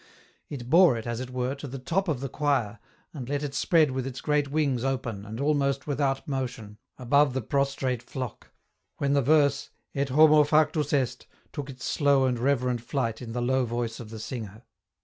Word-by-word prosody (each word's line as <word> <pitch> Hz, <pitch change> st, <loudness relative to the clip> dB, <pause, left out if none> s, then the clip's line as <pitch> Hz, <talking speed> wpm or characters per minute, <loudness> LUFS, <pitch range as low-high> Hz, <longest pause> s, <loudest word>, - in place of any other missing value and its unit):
It 125 Hz, -5 st, -7 dB
bore 165 Hz, -2 st, +6 dB
it, 110 Hz, -, -6 dB
as 120 Hz, -1 st, -3 dB
it 130 Hz, -1 st, -5 dB
were, 125 Hz, +1 st, -2 dB
to 140 Hz, +1 st, -8 dB
the 135 Hz, +1 st, -6 dB
top 175 Hz, +9 st, -1 dB
of 145 Hz, -6 st, -1 dB
the 135 Hz, -, -2 dB
26 140 Hz, -, -15 dB
EN 150 Hz, -, +1 dB
ROUTE. 140 Hz, -2 st, +5 dB
choir, 110 Hz, -, -17 dB, 0.3 s
and 130 Hz, -5 st, -7 dB
let 145 Hz, 0 st, -1 dB
it 145 Hz, -2 st, -4 dB
spread 155 Hz, 0 st, +3 dB
with 130 Hz, 0 st, -3 dB
its 130 Hz, -1 st, -6 dB
great 150 Hz, -1 st, 0 dB
wings 140 Hz, -5 st, 0 dB
open 120 Hz, -6 st, -3 dB
and 110 Hz, +2 st, -6 dB
almost 140 Hz, -1 st, +1 dB
without 140 Hz, -2 st, -1 dB
motion, 120 Hz, -6 st, -4 dB, 0.2 s
above 140 Hz, +2 st, +3 dB
the 130 Hz, -, 0 dB
prostrate 135 Hz, -1 st, -1 dB
flock, 130 Hz, -4 st, -7 dB, 0.5 s
when 140 Hz, 0 st, 0 dB
the 140 Hz, -, +3 dB
verse 140 Hz, 0 st, +3 dB
" -, -, -50 dB
Et 140 Hz, 0 st, -1 dB
homo 155 Hz, +2 st, +6 dB
factus 150 Hz, 0 st, +2 dB
est 135 Hz, -4 st, -1 dB
" -, -, -37 dB
took 145 Hz, -2 st, -5 dB
its 130 Hz, -1 st, -8 dB
slow 140 Hz, -2 st, +3 dB
and 125 Hz, -2 st, 0 dB
reverent 125 Hz, -2 st, +1 dB
flight 115 Hz, -2 st, -2 dB
in 115 Hz, -2 st, -7 dB
the 120 Hz, 0 st, -2 dB
low 130 Hz, +1 st, +2 dB
voice 120 Hz, -1 st, -3 dB
of 115 Hz, -3 st, -9 dB
the 110 Hz, -, -8 dB
singer. 110 Hz, -1 st, -7 dB
135 Hz, 215 wpm, -27 LUFS, 125-145 Hz, 0.5 s, bore